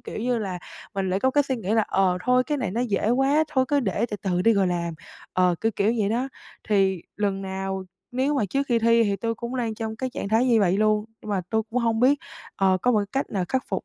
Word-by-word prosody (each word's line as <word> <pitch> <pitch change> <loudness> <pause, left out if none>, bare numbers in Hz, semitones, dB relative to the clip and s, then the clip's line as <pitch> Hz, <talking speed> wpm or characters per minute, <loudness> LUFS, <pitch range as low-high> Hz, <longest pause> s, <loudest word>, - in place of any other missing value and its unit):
kiểu - - -7
như 240 +1 0
là, 190 -4 -3 0.4
mình 190 -1 -1
lại 190 +2 0
có 260 - +3
cái 290 +1 +3
suy 265 -2 -2
nghĩ 205 -3 -4
là, 220 - +4
ờ, 185 -2 +2
thôi 250 0 +4
cái 295 -2 -1
này 215 -8 -2
nó 230 +5 -2
dễ 220 -2 0
quá, 275 +5 +3
thôi 265 -4 +2
cứ 290 -1 +2
để 215 +1 0
từ 210 - -2
từ 180 -2 0
đi 230 - +5
rồi 195 -2 +2
làm. 170 -2 -2 0.4
Ờ, 180 -1 +3
kiểu 225 0 +1
kiểu 210 +3 +2
vậy 205 -2 +1
đó. 245 +5 -1 0.4
Thì 190 -4 +2
lần 200 -2 -1
nào, 190 0 -4 0.3
nếu 265 +4 +1
mà 245 -7 +1
trước 275 - +1
khi 235 -2 +3
thi 230 0 +4
thì 200 -2 0
tui 230 +3 -2
cũng 235 +3 -5
đang 230 -3 -1
trong 220 0 -4
cái 255 +2 -3
trạng 200 - -4
thái 225 +4 +3
như 230 -4 +4
vậy 185 -1 +3
luôn. 215 0 +2 0.2
Nhưng 210 - -6
mà 195 - +1
tui 220 0 +1
cũng 250 - 0
hông 230 -1 +1
biết, 275 +3 +4 0.4
ờ, 190 -1 +3
có 250 - +3
một 210 -2 +3
cách 270 - -1
nào 190 -3 -1
khắc 260 -1 0
phục - - -3
220 Hz, 270 wpm, -25 LUFS, 195-250 Hz, 0.4 s, đi